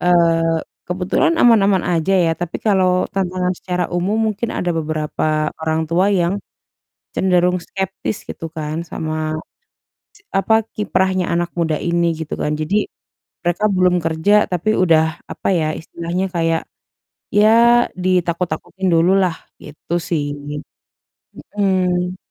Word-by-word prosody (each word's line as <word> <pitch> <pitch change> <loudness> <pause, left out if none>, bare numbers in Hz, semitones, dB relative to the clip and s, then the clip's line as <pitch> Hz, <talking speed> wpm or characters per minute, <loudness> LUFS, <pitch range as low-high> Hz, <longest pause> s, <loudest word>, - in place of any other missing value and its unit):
eee, 165 -2 +3 0.3
kebetulan 185 - +1
aman-aman 205 -6 +4
aja 170 +3 +1
ya, 165 - +2
tapi 175 -1 -3
kalau 185 -3 +3
tantangan 185 -1 -1
secara 180 -1 -2
umum 190 +5 0 0.2
mungkin 225 +3 -4
ada 180 - -1
beberapa 155 -1 -1
orang 160 0 0
tua 180 +3 +2
yang 190 0 +1 0.8
cenderung 180 -1 +2
skeptis 190 +2 -4
gitu 165 - -7
kan, 155 0 -4
sama 155 -1 -4 1.0
ci 415 - -22
apa, 195 +3 +2 0.2
kiprahnya 190 -3 0
anak 175 0 -1
muda 165 -2 +1
ini 170 0 +1
gitu 160 -1 -5
kan. 150 - -1
Jadi, 170 +8 0 0.5
mereka 175 +3 -1
belum 180 -1 +3
kerja 165 +6 +3
tapi 195 +5 +1
udah, 165 -3 +4 0.3
apa - - -4
ya, 160 -2 +1
istilahnya 170 +3 -3
kayak, 165 -1 +1 0.7
ya, 210 +1 +6 0.5
ditakut-takutin 180 +1 -1
dulu 165 +2 +4
lah, 185 -4 +2 0.2
gitu 150 +3 -7
sih. 155 -4 -2 1.2
Mhm. 185 -2 0
180 Hz, 125 wpm, -19 LUFS, 165-190 Hz, 1.2 s, ya